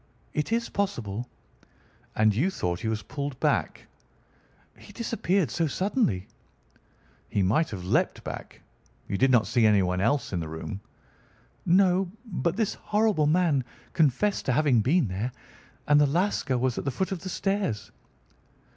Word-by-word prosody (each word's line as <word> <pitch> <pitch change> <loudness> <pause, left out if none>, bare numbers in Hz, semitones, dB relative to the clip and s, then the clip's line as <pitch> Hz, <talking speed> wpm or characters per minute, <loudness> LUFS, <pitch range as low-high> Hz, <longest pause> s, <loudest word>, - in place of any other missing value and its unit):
"It 150 +7 -2
is 235 +1 +1
possible." 120 - -3 0.9
"And 110 -1 +4
you 140 - +1
thought 90 - -2
he 115 - -4
was 110 -1 -2
pulled 140 -1 -5
back?" - - 0 0.9
"He - - -15
disappeared 195 - 0
so 165 +3 0
suddenly." 170 - 0 1.0
"He 100 - +1
might 115 - +2
have 90 -4 -6
leaped - - +1
back. - - -8 0.5
You - - -2
did 135 - +4
not 120 -5 +4
see 115 +4 +1
anyone 95 -3 +2
else 120 +2 +1
in 90 - 0
the 80 - -4
room?" 90 +5 -6 0.9
"No, 185 +1 +4 0.2
but 170 - -1
this 220 -1 0
horrible 210 -8 +1
man 155 -4 +2 0.3
confessed 165 +7 +2
to 130 - +3
having 140 -5 +3
been 140 - +2
there, 100 +7 -3 0.6
and 145 0 +5
the 145 - +5
Lascar 165 -4 0
was 125 -1 0
at - - -6
the - - +1
foot 190 +9 -2
of 190 - -2
the 185 - -6
stairs." 195 - -2
140 Hz, 155 wpm, -27 LUFS, -, 1.0 s, and